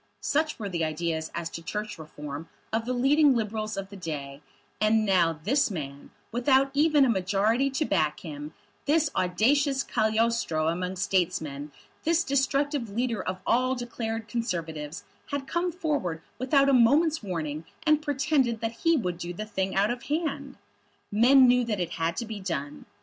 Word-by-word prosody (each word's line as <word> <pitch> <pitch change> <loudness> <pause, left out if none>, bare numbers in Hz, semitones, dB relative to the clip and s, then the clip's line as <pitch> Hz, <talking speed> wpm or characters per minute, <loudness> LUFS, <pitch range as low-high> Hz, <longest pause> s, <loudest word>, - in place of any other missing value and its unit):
Such 310 +1 0
were 210 - -4
the 170 -4 -2
ideas 160 0 -2
as 170 -1 -2
to 165 - -6
Church 210 +2 -5
Reform 150 0 -8 0.2
of 225 0 0
the 255 - 0
leading 275 +3 +4
Liberals 215 -2 -2
of 195 0 -4
the - - -8
day; 145 -6 -6 0.4
and 215 0 +3
now 170 -5 +2
this 275 +7 +2
man, 140 -7 -6 0.2
without 265 +3 +3
even 295 -1 +4
a - - +2
majority 210 +5 +2
to 275 +3 -1
back 155 - 0
him, 150 -2 -7 0.3
this 300 0 +2
audacious 270 +10 +2
Cagliostro 220 -8 +1
among 180 +2 -2
statesmen, 165 -7 -1 0.3
this 335 +1 +2
destructive 280 -2 0
leader 230 0 -1
of 185 0 -4
all 255 +2 +2
declared 230 -2 -4
Conservatives, 165 -9 -4 0.2
had 285 -1 -3
come 345 +4 -1
forward 290 - -2 0.2
without 275 +2 +3
a 275 - +4
moment's 295 +6 +4
warning, 160 -6 -4 0.2
and 305 -1 +4
pretended 280 -5 +1
that 225 0 -2
he 330 -1 +4
would 180 -8 -2
do 175 0 -5
the 215 +5 -5
thing 190 -3 -2
out 200 +3 +3
of 240 0 -4
hand! 285 -3 -2 0.5
Men 255 +5 +6
knew 250 0 +4
that 215 -4 -2
it 175 -2 -2
had 165 0 -1
to 235 - -2
be 220 -2 -6
done. 150 -7 -5
220 Hz, 165 wpm, -27 LUFS, 175-270 Hz, 0.5 s, Men